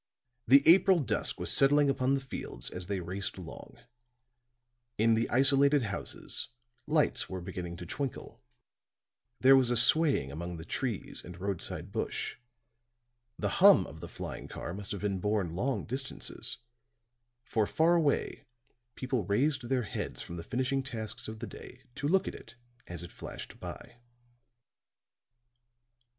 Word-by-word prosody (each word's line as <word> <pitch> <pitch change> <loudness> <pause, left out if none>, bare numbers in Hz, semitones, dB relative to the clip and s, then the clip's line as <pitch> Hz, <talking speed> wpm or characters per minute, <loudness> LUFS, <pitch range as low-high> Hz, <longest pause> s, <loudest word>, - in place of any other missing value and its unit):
The 140 +4 +7
April 185 +2 +7
dusk 145 - -1
was - - 0
settling 145 +1 +5
upon 135 0 +2
the - - 0
fields 135 - -6
as 90 -1 -6
they 100 -1 -1
raced 95 +3 -4
along; 90 -3 -10 1.2
in 115 +1 +4
the 115 +1 +1
isolated 140 +2 +5
houses, 100 -4 -4 0.4
lights 150 0 +2
were 95 - -4
beginning 90 -1 -6
to 90 - -7
twinkle; 135 - -5 1.0
there 135 +1 +8
was 130 -2 +4
a 120 - +2
swaying 135 - +5
among 85 +3 -5
the 80 - -8
trees 115 +2 -3
and 90 0 -10
roadside 95 -2 -4
bush; - - -3 1.0
the - - -1
hum - - +8
of - - -11
the - - -7
flying - - -7
car 85 - -6
must 100 +1 -7
have 100 - -4
been 100 -2 -1
borne 100 -4 0
long 120 +1 -1
distances; 130 +2 -4 0.9
for 110 -3 0
far 165 +2 +3
away 160 -5 +1 0.5
people 130 -4 -1
raised 130 - +1
their 130 -2 +1
heads 105 - -4
from 85 - -8
the 85 - -6
finishing 130 +6 -1
tasks 120 -2 -5
of 110 0 -6
the - - -5
day - - -11
to 145 - -3
look 190 +4 +3
at - - -3
it 115 - -12 0.3
as 85 0 -6
it 85 - -9
flashed - - -9
by. 120 - -9
120 Hz, 150 wpm, -31 LUFS, 95-135 Hz, 1.2 s, there